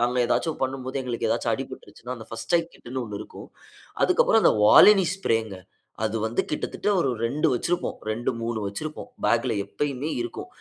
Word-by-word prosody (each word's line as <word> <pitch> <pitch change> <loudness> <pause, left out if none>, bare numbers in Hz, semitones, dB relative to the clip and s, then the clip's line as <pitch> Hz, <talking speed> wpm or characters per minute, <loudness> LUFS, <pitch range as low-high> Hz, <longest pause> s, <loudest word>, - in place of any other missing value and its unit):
நாங்க 120 +1 +1
ஏதாச்சும் 155 +6 0
பண்ணும்போது 130 0 -2
எங்களுக்கு 125 -3 -2
ஏதாச்சும் - - 0
அடிபட்டுருச்சுனா 125 +2 -8
அந்த 110 - -10
பர்ஸ்ட் 115 0 -5
எய்ட் 170 0 -2
கிட்டுனு 130 +2 -6
1 105 -3 -6
இருக்கும். - - -10 0.5
அதுக்கப்புறம் - - +4
அந்த - - +6
Volini 195 - +8
ஸ்ப்ரேங்க 115 - -1 0.5
அது 110 +1 -1
வந்து 110 +2 0
கிட்டத்தட்ட 150 - -3
1 140 - +1 0.2
2 145 +7 +1
வச்சிருப்போம். 175 +8 -1
2, 115 +3 -1
3 115 -1 -2
வச்சிருப்போம். 150 +10 -6 0.2
பேக்ல 120 +1 +2
எப்பயுமே 140 +7 -3
இருக்கும். 120 -1 -5
125 Hz, 160 wpm, -25 LUFS, 115-145 Hz, 0.5 s, Volini